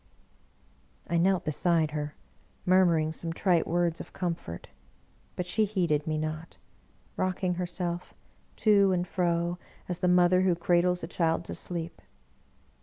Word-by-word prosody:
I 170 - 0
knelt 185 +1 +2
beside 160 0 +2
her, 150 -1 -4 0.5
murmuring 175 -4 +4
some 165 +1 -4
trite 170 -1 +1
words 170 -1 0
of - - -9
com 175 -2 -1
fort; 85 - -9 0.7
but 180 - -3
she 215 +5 +1
heeded 170 -8 0
me 155 -1 0
not, 155 +1 -5 0.6
rocking 185 -1 0
herself 175 0 -3 0.4
to 200 -3 +4
and 180 0 -1
fro 175 -1 0 0.3
as 180 -1 -3
the 180 - +1
mother 180 0 +5
who 185 -2 +3
cradles 175 +1 +1
a - - -3
child 165 -1 0
to - - -6
sleep. 170 -2 -4
175 Hz, 140 wpm, -28 LUFS, 165-180 Hz, 0.7 s, mother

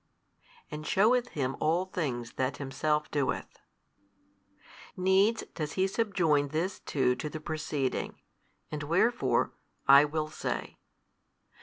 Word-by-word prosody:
and 150 0 -6
sheweth 240 +5 +3
Him 135 - -2
all 165 +4 +2
things 135 - -3
that 130 0 -1
Himself 150 +2 -1
doeth; 145 -2 -2 1.4
Needs 190 +5 +3
does 150 -2 -4
He 190 - +2
subjoin 185 -8 +1
this 165 +6 -2
too 135 -3 +1
to 150 - -4
the 155 - -6
preceding; 150 -4 -3 0.5
and 150 -1 -4
wherefore, 175 +11 +2 0.4
I 140 +2 +9
will 155 +1 -2
say. - - -4
155 Hz, 115 wpm, -30 LUFS, 145-190 Hz, 1.4 s, I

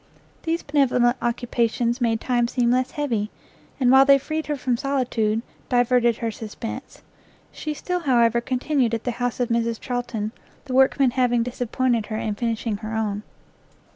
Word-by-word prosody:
These 335 0 -1
benevolent 250 -4 +2
occupations 235 0 0
made 225 -2 +2
time 240 -1 +1
seem 240 -1 +1
less 255 +1 +2
heavy, 235 -8 -2 0.5
and 250 -2 +4
while 265 0 +8
they 275 0 +6
freed 310 +3 -4
her 300 - -1
from 255 -2 0
solitude, 235 -4 0 0.3
diverted 245 -2 +3
her 230 -1 -2
suspense. 225 +4 -7 0.5
She 305 -1 -5
still, 360 +5 -2
however, 235 -6 +3
continued 255 -1 0
at 225 - -5
the 245 - -1
house 245 0 -1
of 245 -1 0
Mrs 230 -1 0
Charlton, 240 -4 -3 0.3
the 260 - -5
workmen 265 0 +4
having 245 -2 +2
disappointed 245 -1 -1
her 215 - -3
in 220 -1 -2
finishing 225 -1 -2
her 220 +1 -5
own. 210 -2 -1
245 Hz, 160 wpm, -23 LUFS, 230-260 Hz, 0.5 s, while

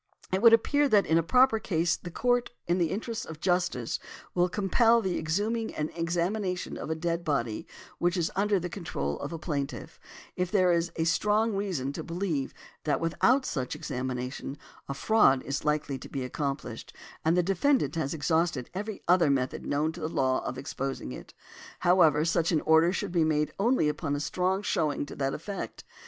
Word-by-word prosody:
|159| - - +2
It 190 - -1
would 230 -1 +8
appear 285 +5 +4
that 205 -4 +4
in 160 +1 +3
a - - +3
proper 250 +6 +4
case 170 -6 +1
the 175 - -9
Court, 245 +6 +1 0.2
in 175 +2 +1
the 170 -2 +2
interests 225 +4 -3
of 160 -1 -9
justice, 175 -8 0 0.3
will 180 0 +2
compel 225 +5 +3
the 190 -5 -1
exhuming 215 +8 -1
and 150 0 -2
examination 180 +3 -1
of - - -6
a 160 - 0
dead 170 +1 -2
body 120 -9 -1 0.3
which 175 +1 +1
is 170 -2 0
under 200 0 +2
the 180 - -3
control 75 - -4
of - - -5
a 165 - -4
plaintiff, 145 -4 -4 0.4
if 180 -1 -1
there 185 -2 +3
is 170 0 +1
strong 210 +6 +2
reason 180 -10 -2
to - - -5
believe 165 -6 -2 0.3
that 150 - +1
without 245 - +2
such 130 -4 -3
examination 130 +2 -4 0.3
a 140 - -3
fraud 140 -6 +4
is 140 +2 -3
likely 150 -2 0
to - - -10
be 135 -2 -3
accomplished, 135 -3 -4 0.3
and 165 +2 +3
the 180 - +4
defendant 195 - +2
has 160 -2 -2
exhausted 160 -3 0
every 205 +2 -5
other 175 -3 +5
method 130 -2 -1
known 150 +2 +1
to 170 - -10
the 155 -1 -3
law 130 -4 +1
of 125 - -4
exposing 135 - -4
it. 65 - -10 0.5
However, 165 -4 +4
such 165 0 +1
an 155 -3 +2
order 160 +2 +4
should 200 0 -3
be 170 -2 +3
made 155 -1 +1
only 235 -5 +3
upon 150 -1 -1
a - - -2
strong 185 +5 0
showing 150 -7 0
to - - -9
that 135 -1 -1
effect. 195 +5 -6
170 Hz, 190 wpm, -28 LUFS, 145-195 Hz, 0.5 s, would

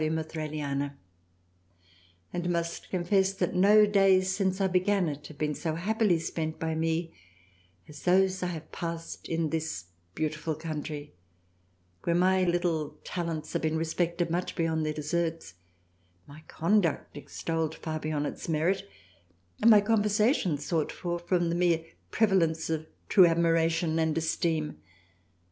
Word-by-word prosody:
of 155 0 -1
Thraliana, 145 -3 -3 1.4
and 175 0 -2
must 170 -1 -2
confess 190 +2 +1
that 195 - -1
no 205 +3 +6
Days 195 -2 +4
since 190 -1 0
I 195 - +2
began 185 0 +2
it 150 -1 -5
have 155 - -13
been 150 -1 -1
so 155 +2 -3
happily 205 +1 +2
spent 160 -1 -3
by 160 0 -1
me 165 +1 -1 0.7
as 145 -2 -11
those 190 +1 +3
I 180 - 0
have 160 -3 -6
passed 165 -1 -6
in 165 -2 0
this 160 - -3 0.3
beautiful 155 0 -2
country; 150 - -6 0.9
v^rhere 170 0 +1
my 185 +1 +3
little 170 -4 0
Talents 165 -3 -4
have - - 0
been 160 0 0
respected 170 +1 -1
much 175 +2 -2
beyond 160 -2 0
their 155 - -1
Deserts: 160 - -2 0.7
my 145 +2 -13
Conduct 170 -1 +1
extolled 160 +2 -3
far 155 -1 -4
above 155 -1 -2
its - - -5
Merit, 185 +5 0 0.7
and 230 - +6
my 210 -2 +8
Conversation 210 - +2
sought 155 +1 -1
for 175 -1 -3
from 175 0 0
the 170 - 0
mere 170 -2 +2 0.2
Prevalence 165 -7 +2
of 160 0 -2 0.2
true 185 - +7
admira 165 -1 +3
tion 165 -1 0
and 160 -1 +1
Esteem. 160 -1 -1
165 Hz, 145 wpm, -29 LUFS, 155-185 Hz, 1.4 s, my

